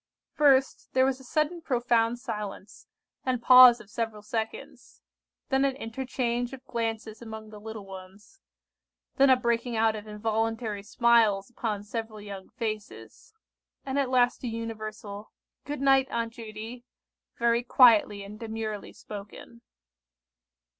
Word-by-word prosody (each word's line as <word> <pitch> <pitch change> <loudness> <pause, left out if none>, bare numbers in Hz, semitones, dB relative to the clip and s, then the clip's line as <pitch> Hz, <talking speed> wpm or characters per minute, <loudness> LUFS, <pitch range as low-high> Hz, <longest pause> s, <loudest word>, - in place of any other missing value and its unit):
First, 275 -2 +3
there 260 0 +4
was 265 -1 0
a - - -14
sudden 305 +6 -1
profound 240 -5 +1
silence, 210 -5 -7 0.4
and 255 -2 0
pause 250 0 +9
of 210 - -15
several 225 -2 -4
seconds; 220 +1 -6 0.5
then 270 0 +2
an 275 -1 +1
interchange 245 0 -3
of 265 -1 -10
glances 225 -1 -4
among 220 -1 -9
the 210 - -10
little 220 -1 -8
ones; 195 - -13 0.8
then 275 0 +6
a 260 - +8
breaking 235 -1 -1
out 220 0 +2
of 215 0 -8
involuntary 220 0 -2
smiles 220 -1 +3
upon 215 -4 -3
several 220 0 -5
young 200 -2 -9
faces; 215 - -7 0.5
and 275 +1 -1
at 270 -2 0
last 250 -1 +2
a - - -2
universal 215 -2 -6 0.3
"Good 290 -1 -5
night, 270 -1 +4
Aunt 230 -1 -2
Judy!" 225 +2 -8 0.5
very 235 0 +2
quietly 225 -5 +5
and 210 +2 -10
demurely 220 -2 -5
spoken. 210 +3 -10
230 Hz, 135 wpm, -28 LUFS, 215-250 Hz, 0.8 s, pause